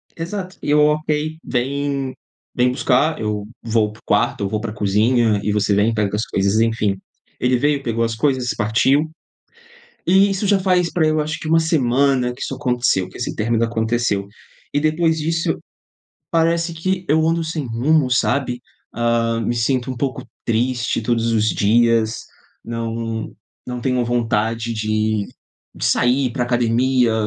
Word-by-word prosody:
Exato. 185 Hz, +2 st, -5 dB
E -, -, -4 dB
eu: 150 Hz, -, +5 dB
"Ok, 155 Hz, +1 st, -1 dB
vem 135 Hz, +1 st, -2 dB, 0.4 s
vem 125 Hz, 0 st, +3 dB
buscar, 140 Hz, +5 st, +1 dB
eu 105 Hz, -1 st, -2 dB
vou 110 Hz, -2 st, +1 dB
pra 110 Hz, -, -16 dB
o -, -, -32 dB
quarto, -, -, +1 dB
ou 95 Hz, -, -1 dB
vou 110 Hz, -, -1 dB
pra 110 Hz, -1 st, -4 dB
a -, -, -8 dB
cozinha 105 Hz, +2 st, +2 dB
e 105 Hz, -, 0 dB
você 105 Hz, -1 st, +1 dB
vem 105 Hz, +3 st, +3 dB
e -, -, -3 dB
pega 105 Hz, -1 st, 0 dB
as 105 Hz, -, -1 dB
coisas, 100 Hz, +3 st, +1 dB
enfim". 110 Hz, -3 st, +1 dB, 0.4 s
Ele 125 Hz, 0 st, +2 dB
veio, 145 Hz, +1 st, +1 dB
pegou 115 Hz, -1 st, -1 dB
as 115 Hz, -1 st, -1 dB
coisas 130 Hz, -1 st, 0 dB
e -, -, -5 dB
partiu. 130 Hz, +8 st, +2 dB, 1.0 s
E 195 Hz, +3 st, +5 dB
isso 195 Hz, +1 st, -1 dB
já 200 Hz, -1 st, +3 dB
faz 180 Hz, -2 st, +2 dB
pra 170 Hz, -, +1 dB
aí 155 Hz, -, +4 dB
eu 155 Hz, -, +1 dB
acho 155 Hz, +2 st, -3 dB
que 160 Hz, -, -6 dB
1 165 Hz, +1 st, +4 dB
semana 135 Hz, -4 st, +2 dB
que 125 Hz, -, -14 dB
isso 135 Hz, -, -3 dB
aconteceu, 125 Hz, -8 st, 0 dB
que -, -, -12 dB
esse -, -, -4 dB
término 115 Hz, +1 st, 0 dB
aconteceu 115 Hz, -3 st, 0 dB, 0.5 s
e 145 Hz, -, +2 dB
depois 160 Hz, +1 st, +1 dB
disso, 165 Hz, +2 st, -1 dB, 0.7 s
parece 165 Hz, 0 st, +1 dB
que 185 Hz, +3 st, -2 dB
eu 160 Hz, +2 st, +3 dB
ando 165 Hz, 0 st, +1 dB
sem 160 Hz, -3 st, -3 dB
rumo, 130 Hz, +4 st, +1 dB
sabe, 125 Hz, 0 st, 0 dB, 0.3 s
ah, 115 Hz, -1 st, 0 dB
me 115 Hz, +2 st, -1 dB
sinto 125 Hz, +2 st, 0 dB
um 130 Hz, -, -5 dB
pouco 130 Hz, -1 st, -2 dB, 0.2 s
triste 120 Hz, +1 st, 0 dB
todos 115 Hz, 0 st, 0 dB
os 110 Hz, -1 st, +2 dB
dias 115 Hz, +1 st, +2 dB, 0.5 s
não 115 Hz, -1 st, -4 dB, 0.3 s
não 125 Hz, -1 st, -4 dB
tenho 125 Hz, -1 st, 0 dB
vontade 115 Hz, -1 st, 0 dB
de 110 Hz, -1 st, -1 dB, 0.5 s
de -, -, -5 dB
sair, 130 Hz, +2 st, +2 dB
ir 125 Hz, -, -2 dB
pra 125 Hz, -, -1 dB
academia, 120 Hz, 0 st, +2 dB
125 Hz, 175 wpm, -20 LUFS, 115-150 Hz, 1.0 s, eu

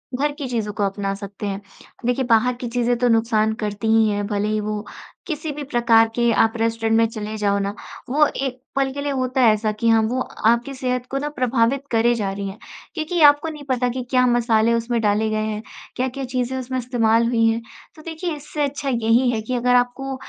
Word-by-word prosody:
घर 290 Hz, +3 st, 0 dB
की 285 Hz, -2 st, -6 dB
चीज़ों 220 Hz, -4 st, -2 dB
को 205 Hz, -, -2 dB
अपना 195 Hz, 0 st, -1 dB
सकते 200 Hz, +1 st, -8 dB
हैं। 195 Hz, 0 st, -4 dB, 0.4 s
देखिए 245 Hz, +2 st, +1 dB
बाहर 235 Hz, +1 st, +3 dB
की 245 Hz, 0 st, -6 dB
चीज़ें 245 Hz, 0 st, +1 dB
तो 245 Hz, 0 st, +2 dB
नुकसान 225 Hz, -1 st, +2 dB
करती 210 Hz, +1 st, -3 dB
ही 220 Hz, -1 st, +4 dB
हैं, 205 Hz, 0 st, -1 dB
भले 205 Hz, 0 st, -1 dB
ही 215 Hz, 0 st, 0 dB
वो 210 Hz, 0 st, -3 dB, 0.4 s
किसी 310 Hz, -1 st, -3 dB
भी 290 Hz, 0 st, -6 dB
प्रकार 235 Hz, -4 st, +4 dB
के 235 Hz, -1 st, +2 dB
आप 225 Hz, 0 st, +3 dB
रेस्टोरेंट 225 Hz, 0 st, 0 dB
में 230 Hz, -, +4 dB
चले 215 Hz, -1 st, -5 dB
जाओ 200 Hz, -1 st, +1 dB
ना, 200 Hz, +1 st, -2 dB, 0.4 s
वो 300 Hz, +3 st, +4 dB
एक 260 Hz, -2 st, -4 dB
पल 270 Hz, -1 st, +1 dB
के 285 Hz, -, -4 dB
लिए 285 Hz, 0 st, -2 dB
होता 260 Hz, 0 st, 0 dB
है 225 Hz, -3 st, +6 dB
ऐसा 215 Hz, 0 st, -1 dB
कि 220 Hz, +2 st, -2 dB
हाँ, 225 Hz, -1 st, +5 dB
वो 240 Hz, +4 st, -1 dB, 0.3 s
आपकी 235 Hz, +4 st, +2 dB
सेहत 250 Hz, -2 st, -2 dB
को 270 Hz, -, -2 dB
ना 290 Hz, +2 st, -2 dB
प्रभावित 255 Hz, -1 st, +1 dB
करे 235 Hz, +1 st, +3 dB
जा 200 Hz, -4 st, -2 dB
रही 200 Hz, 0 st, -4 dB
हैं। 195 Hz, -, -9 dB, 0.4 s
क्योंकि 320 Hz, +1 st, -1 dB
आपको 290 Hz, +2 st, +6 dB
नहीं 300 Hz, -2 st, -8 dB
पता 250 Hz, -1 st, +1 dB
कि 250 Hz, +1 st, -4 dB
क्या 255 Hz, -1 st, +3 dB
मसाले 235 Hz, -2 st, +3 dB
उसमें 230 Hz, 0 st, 0 dB
डाले 210 Hz, +1 st, +1 dB
गए 215 Hz, 0 st, -1 dB
हैं, 215 Hz, 0 st, -3 dB, 0.3 s
क्या-क्या 260 Hz, +2 st, -2 dB
चीज़ें 255 Hz, +1 st, -2 dB
उसमें 260 Hz, 0 st, -4 dB
इस्तेमाल 235 Hz, -2 st, +2 dB
हुई 230 Hz, -1 st, +2 dB
हैं। 225 Hz, +1 st, +1 dB, 0.3 s
तो 310 Hz, -, -13 dB
देखिए 325 Hz, +1 st, -4 dB
इससे 295 Hz, +1 st, -4 dB
अच्छा 280 Hz, 0 st, -2 dB
यही 235 Hz, +1 st, +2 dB
है 220 Hz, -, -2 dB
कि 250 Hz, +4 st, -3 dB
अगर 250 Hz, +1 st, +2 dB
आपको 250 Hz, +2 st, 0 dB
235 Hz, 220 wpm, -21 LUFS, 220-260 Hz, 0.4 s, है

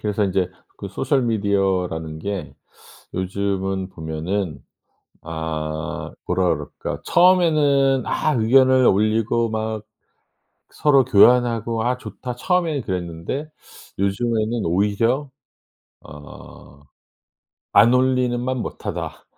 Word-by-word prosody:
그래서 105 Hz, 0 st, 0 dB
인제 95 Hz, -1 st, 0 dB, 0.3 s
그 -, -, -7 dB
소셜 135 Hz, -2 st, 0 dB
미디어라는 95 Hz, -7 st, -1 dB
게 100 Hz, +3 st, -5 dB, 0.6 s
요즘은 95 Hz, 0 st, -2 dB
보면은 80 Hz, +1 st, -4 dB, 0.6 s
아 80 Hz, -1 st, -4 dB, 0.2 s
뭐라 90 Hz, 0 st, +1 dB
그럴까? 75 Hz, -3 st, -7 dB
처음에는 150 Hz, -7 st, +3 dB
아 155 Hz, -2 st, 0 dB
의견을 130 Hz, +2 st, +4 dB
올리고 110 Hz, +3 st, +2 dB
막 110 Hz, -1 st, -3 dB, 0.9 s
서로 140 Hz, -3 st, +3 dB
교환하고 115 Hz, 0 st, +3 dB
'아 125 Hz, +1 st, 0 dB
좋다.' 125 Hz, -1 st, -7 dB
처음에는 165 Hz, -1 st, 0 dB
그랬는데 90 Hz, -, -4 dB, 0.5 s
요즘에는 110 Hz, +3 st, 0 dB
오히려 105 Hz, -, +1 dB, 0.7 s
어 70 Hz, -1 st, -13 dB, 0.9 s
'안 115 Hz, +1 st, +6 dB
올리는만 125 Hz, 0 st, +1 dB
못하다.' -, -, -5 dB
110 Hz, 220 characters per minute, -21 LUFS, 95-125 Hz, 0.9 s, 안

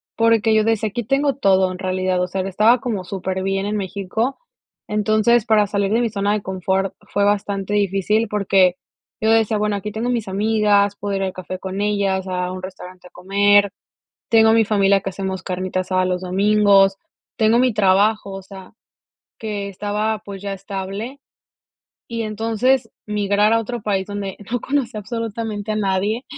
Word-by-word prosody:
porque 225 Hz, -1 st, +3 dB
yo 215 Hz, -, +4 dB
decía 225 Hz, -1 st, 0 dB
aquí 240 Hz, +3 st, -4 dB
tengo 275 Hz, +4 st, +1 dB
todo 190 Hz, -6 st, +3 dB
en 185 Hz, -, -8 dB
realidad, 185 Hz, -1 st, -1 dB
o 180 Hz, -, 0 dB
sea, 190 Hz, +1 st, -3 dB
estaba 215 Hz, +6 st, +3 dB
como 220 Hz, -8 st, -3 dB
superbién 190 Hz, +1 st, -2 dB
en 210 Hz, -, -2 dB
México. 200 Hz, +5 st, -2 dB, 0.5 s
Entonces, 215 Hz, +2 st, +2 dB
para 215 Hz, -2 st, +4 dB
salir 200 Hz, 0 st, -1 dB
de 230 Hz, +2 st, +2 dB
mi 235 Hz, -, +1 dB
zona 200 Hz, 0 st, 0 dB
de 210 Hz, -1 st, -2 dB
confort 190 Hz, +1 st, -1 dB, 0.2 s
fue 200 Hz, -, +1 dB
bastante 200 Hz, -1 st, 0 dB
difícil, 205 Hz, +2 st, +1 dB
porque, 195 Hz, -3 st, +3 dB, 0.4 s
yo 220 Hz, -1 st, +2 dB
decía, 225 Hz, -1 st, +3 dB
bueno, 210 Hz, 0 st, 0 dB
aquí 200 Hz, +1 st, -4 dB
tengo 225 Hz, +4 st, -3 dB
mis 230 Hz, -4 st, -2 dB
amigas, 205 Hz, 0 st, +2 dB
puedo 200 Hz, -1 st, -2 dB
ir 195 Hz, -, -1 dB
al 190 Hz, -, -2 dB
café 185 Hz, 0 st, -6 dB
con 190 Hz, +2 st, -5 dB
ellas, 200 Hz, -2 st, 0 dB
a 180 Hz, -1 st, -2 dB
un 185 Hz, -, -6 dB
restaurante 185 Hz, -1 st, -10 dB
a -, -, -18 dB
comer, 200 Hz, +2 st, +3 dB, 0.6 s
tengo 220 Hz, -1 st, +5 dB
a -, -, +4 dB
mi 225 Hz, 0 st, +5 dB
familia 200 Hz, -2 st, +3 dB
que 195 Hz, -, -3 dB
hacemos 190 Hz, 0 st, -4 dB
carnita 185 Hz, 0 st, -2 dB
asada 185 Hz, 0 st, 0 dB
los 180 Hz, 0 st, -1 dB
domingos, 195 Hz, +1 st, +4 dB, 0.4 s
tengo 225 Hz, +2 st, +3 dB
mi 250 Hz, -3 st, +3 dB
trabajo, 205 Hz, +1 st, +2 dB
o 195 Hz, -, -6 dB
sea, 190 Hz, -1 st, -12 dB, 0.7 s
que 205 Hz, -2 st, -4 dB
estaba, 210 Hz, +2 st, -2 dB
pues, 195 Hz, -2 st, -8 dB
ya 200 Hz, -1 st, -3 dB
estable. 195 Hz, +7 st, -6 dB, 0.9 s
Y 230 Hz, -1 st, -3 dB
entonces 225 Hz, +4 st, 0 dB, 0.2 s
migrar 210 Hz, +1 st, +2 dB
a 230 Hz, -, +3 dB
otro 235 Hz, 0 st, -5 dB
país 195 Hz, -2 st, -1 dB
donde 205 Hz, -2 st, -5 dB
no 245 Hz, -, 0 dB
conocía 260 Hz, -6 st, -2 dB
absolutamente 220 Hz, -1 st, -4 dB
a -, -, -3 dB
nadie, 205 Hz, +4 st, 0 dB
205 Hz, 175 wpm, -20 LUFS, 190-220 Hz, 0.9 s, tengo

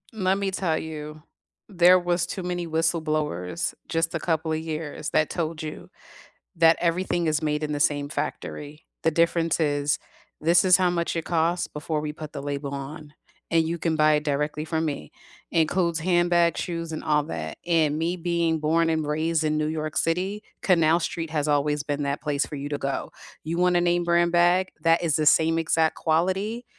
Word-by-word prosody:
Let 190 Hz, -2 st, +1 dB
me 200 Hz, -1 st, -1 dB
tell 175 Hz, -4 st, 0 dB
you, 150 Hz, -1 st, -7 dB, 0.4 s
there 180 Hz, -2 st, +6 dB
was 175 Hz, 0 st, 0 dB
too 190 Hz, -, -5 dB
many 175 Hz, -1 st, -3 dB
whistleblowers 155 Hz, -, -1 dB, 0.2 s
just 165 Hz, 0 st, 0 dB
a 165 Hz, -, -1 dB
couple 160 Hz, -1 st, -1 dB
of 155 Hz, -, 0 dB
years 155 Hz, -1 st, -5 dB
that 155 Hz, -, +1 dB
told 160 Hz, -1 st, -3 dB
you 155 Hz, -, -7 dB, 0.7 s
that 165 Hz, -1 st, +5 dB
everything 175 Hz, 0 st, 0 dB
is 155 Hz, -1 st, +1 dB
made 150 Hz, 0 st, -1 dB
in 150 Hz, -, -3 dB
the 145 Hz, -, -3 dB
same 145 Hz, -1 st, +1 dB
factory. 150 Hz, 0 st, -5 dB, 0.2 s
The 160 Hz, -, +3 dB
difference 165 Hz, 0 st, +1 dB
is, 145 Hz, -2 st, +1 dB, 0.4 s
this 170 Hz, +4 st, +4 dB
is 185 Hz, -1 st, +7 dB
how 185 Hz, -2 st, +2 dB
much 170 Hz, -1 st, -1 dB
it 165 Hz, -, -2 dB
costs 170 Hz, +1 st, 0 dB
before 150 Hz, +1 st, -3 dB
we 150 Hz, 0 st, -4 dB
put 155 Hz, 0 st, -9 dB
the 140 Hz, -, -5 dB
label 140 Hz, 0 st, -4 dB
on, 145 Hz, +2 st, -7 dB, 0.4 s
and 165 Hz, -1 st, +3 dB
you 170 Hz, +1 st, -2 dB
can 165 Hz, -1 st, 0 dB
buy 155 Hz, 0 st, +4 dB
it 150 Hz, 0 st, +2 dB
directly 150 Hz, +1 st, -1 dB
from 160 Hz, 0 st, -1 dB
me. 140 Hz, -, -4 dB, 0.4 s
It 165 Hz, -, +3 dB
includes 170 Hz, 0 st, 0 dB
handbags, 175 Hz, -1 st, +2 dB
shoes, 165 Hz, -2 st, -4 dB
and 155 Hz, -, -5 dB
all 150 Hz, -1 st, +2 dB
that, 80 Hz, -, -6 dB
and 155 Hz, -3 st, +2 dB
me 170 Hz, +3 st, -1 dB
being 170 Hz, -2 st, 0 dB
born 165 Hz, +2 st, +2 dB
and 160 Hz, -1 st, 0 dB
raised 160 Hz, +2 st, 0 dB
in 155 Hz, 0 st, 0 dB
New 155 Hz, -, 0 dB
York 155 Hz, 0 st, -3 dB
City, 190 Hz, +6 st, -1 dB, 0.2 s
Canal 170 Hz, -2 st, +3 dB
Street 165 Hz, -2 st, -3 dB
has 150 Hz, -1 st, -1 dB
always 145 Hz, 0 st, +1 dB
been 145 Hz, 0 st, -2 dB
that 140 Hz, +1 st, -2 dB
place 145 Hz, -1 st, 0 dB
for -, -, -8 dB
you 145 Hz, 0 st, -5 dB
to 145 Hz, -1 st, -3 dB
go. 135 Hz, 0 st, -3 dB, 0.3 s
You 165 Hz, +2 st, -3 dB
want 180 Hz, 0 st, +3 dB
a 175 Hz, -, +4 dB
name 175 Hz, 0 st, +1 dB
brand 170 Hz, 0 st, +3 dB
bag, 175 Hz, +2 st, +3 dB, 0.2 s
that 165 Hz, +1 st, +4 dB
is 160 Hz, -3 st, +1 dB
the 155 Hz, -, 0 dB
same 165 Hz, +2 st, +4 dB
exact 160 Hz, 0 st, +1 dB
quality 190 Hz, +8 st, 0 dB
160 Hz, 195 wpm, -25 LUFS, 150-170 Hz, 0.7 s, is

